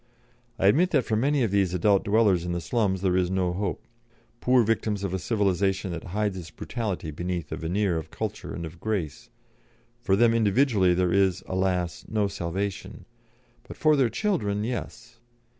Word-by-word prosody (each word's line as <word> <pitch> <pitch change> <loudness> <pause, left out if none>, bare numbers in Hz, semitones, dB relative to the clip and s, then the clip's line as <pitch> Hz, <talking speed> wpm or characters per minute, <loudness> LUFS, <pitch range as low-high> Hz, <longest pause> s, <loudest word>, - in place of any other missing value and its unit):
I - - 0
admit 160 - +4
that 140 -7 +2
for 110 - 0
many 135 +4 +2
of 110 - 0
these 95 -3 +1
adult 100 +2 +3
dwellers 100 -4 +3
in 90 0 -3
the 85 - -1
slums 95 +1 0
there 90 -2 +2
is 90 -1 +1
no 90 -2 0
hope. 100 0 -3 0.5
Poor 125 0 +4
victims 110 -2 -1
of 95 -2 -2
a 95 - -1
civilisation 95 -2 0
that 85 -1 -6
hides 105 +2 -1
its 85 - -9
brutality 100 -9 -4
beneath 85 0 -4
a - - -2
veneer 85 +2 0
of 80 0 -9
culture 105 +2 -5
and 85 - -5
of 80 +2 -10
grace, 95 -9 -3 0.7
for 115 -5 +1
them 115 +2 +4
individually 110 -4 +3
there 90 -1 +1
is, 95 -1 +2
alas! 95 -2 -1
no 105 -2 0
salvation. 95 +1 -4 0.6
But - - -10
for 155 -1 +4
their 130 -4 +3
children, 105 - -1
yes! 120 0 -6
100 Hz, 175 wpm, -26 LUFS, 90-110 Hz, 0.7 s, admit